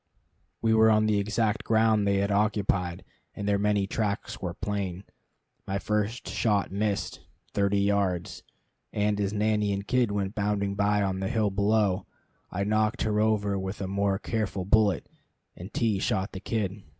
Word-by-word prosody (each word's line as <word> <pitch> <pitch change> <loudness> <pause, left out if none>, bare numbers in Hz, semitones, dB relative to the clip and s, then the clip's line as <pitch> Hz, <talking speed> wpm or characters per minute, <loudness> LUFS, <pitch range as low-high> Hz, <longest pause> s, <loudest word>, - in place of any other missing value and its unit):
We 110 0 +3
were 110 0 +6
on 110 0 +4
the 105 -1 +2
exact 105 +1 0
ground 110 -2 +3
they 100 - +3
had 100 +1 0
occupied, 100 -4 0 0.3
and 100 - -4
their 100 -1 +2
many 105 -1 +2
tracks 100 0 -3
were 90 -2 -4
plain. 100 -3 -3 0.6
My 95 - -1
first 105 +3 -2
shot 105 -4 0
missed 100 0 -1 0.3
thirty 100 0 +2
yards! 100 -3 0 0.5
and 105 0 0
as 100 -1 0
nanny 105 -1 +1
and 100 0 -2
kid 125 -3 +2
went 100 -1 -2
bounding 100 -2 0
by 100 +1 +2
on 95 -1 -1
the 95 0 -2
hill 110 -3 +1
below, 100 -1 +1 0.4
I 100 +2 -2
knocked 110 +3 +1
her 105 -1 +1
over 105 -2 +1
with 95 +2 -5
a 95 - -3
more 100 0 0
careful 105 -3 -2
bullet, 105 0 +3 0.5
and 90 +4 -9
T 115 -8 +1
shot 95 +1 -1
the 95 - -6
kid. 105 -1 -2
100 Hz, 165 wpm, -27 LUFS, 100-110 Hz, 0.6 s, were